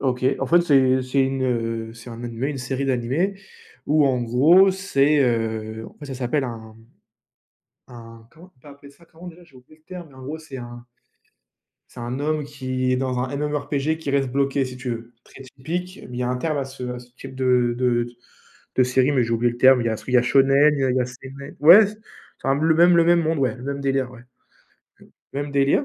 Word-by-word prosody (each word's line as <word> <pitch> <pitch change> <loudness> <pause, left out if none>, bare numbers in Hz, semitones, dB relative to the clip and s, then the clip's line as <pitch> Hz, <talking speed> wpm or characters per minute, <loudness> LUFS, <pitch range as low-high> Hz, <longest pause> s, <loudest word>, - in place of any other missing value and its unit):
OK. 130 -2 -1 0.2
En 135 - -2
fait, 175 +4 +4
c'est 130 -5 +3
c'est 130 +1 +1
une, 135 0 -2
heu, 115 -2 -2
c'est 115 +1 -12
un 115 +1 -9
animé, 120 +3 -3
une 140 -3 -4
série 130 +2 -3
d'animés, 135 +10 -1 0.5
où 150 -1 +3
en 130 -2 +1
gros, 155 +12 +5
c'est, 150 -7 +1
heu 110 -3 -1
en - - -21
fait 145 - -10
ça 135 - -6
s'appelle 130 +2 -1
un 110 -2 -8 1.1
un 115 -1 -13
comment 175 +3 -17
on - - -31
peut - - -17
appeler 140 0 -15
ça, 170 - -22
comment 170 +2 -14
déjà? 175 0 -12
J'ai 140 - -22
oublié 130 +4 -18
le - - -36
terme, 180 -2 -9
mais - - -20
en 130 - -12
gros, 150 +4 -5
c'est 155 -4 -11
un 120 0 -10 1.1
c'est 120 - -11
un 120 +3 -4
homme 150 0 -1
qui 130 -3 -3
est 125 - +2
dans 130 -1 -2
un 130 +2 -3
MMO 150 +1 -1
RPG, 145 +2 -2
qui 160 -3 -4
reste 135 -2 0
bloqué 140 +1 0
si 125 0 -9
tu 125 -1 -5
veux. 115 +1 -6
Très 135 - -14
typique. 165 +8 -6
Mais 125 - -6
il - - -3
y - - 0
a 125 - -1
un 125 - -1
terme 155 +2 -2
à 135 - -1
ce 135 -1 -11
à 125 0 -5
ce 125 0 -15
type 135 0 -10
de 125 -2 +1
de 120 -2 +1
de - - -9 0.7
de 130 - +5
série, 130 +2 +2
mais 130 -4 +2
j'ai 115 - -5
oublié 120 +1 +1
le - - -10
terme. 130 0 +6
Il - - -3
y - - +2
a 110 - -1
sui 125 - -8
il - - 0
y - - +7
a - - +3
shonen, 135 +3 +4
il 140 - -3
y - - +2
a 130 - +1
il 125 - 0
y - - +2
a 125 - 0
seinen. 135 +2 -11
Ouais, 175 +9 +9
s 210 +1 -6 0.5
c'est - - -2
un 135 - +3
le 160 +1 +3
même 175 +2 +5
le 165 - +5
même 170 0 +4
monde 160 0 -1
ouais, 130 -2 0
le 125 - -12
même 140 +1 -4
délire 135 -2 -1
ouais, 125 -2 -13 1.1
même 145 +1 -3
délire, 140 - +2
135 Hz, 255 wpm, -22 LUFS, 125-150 Hz, 1.1 s, Ouais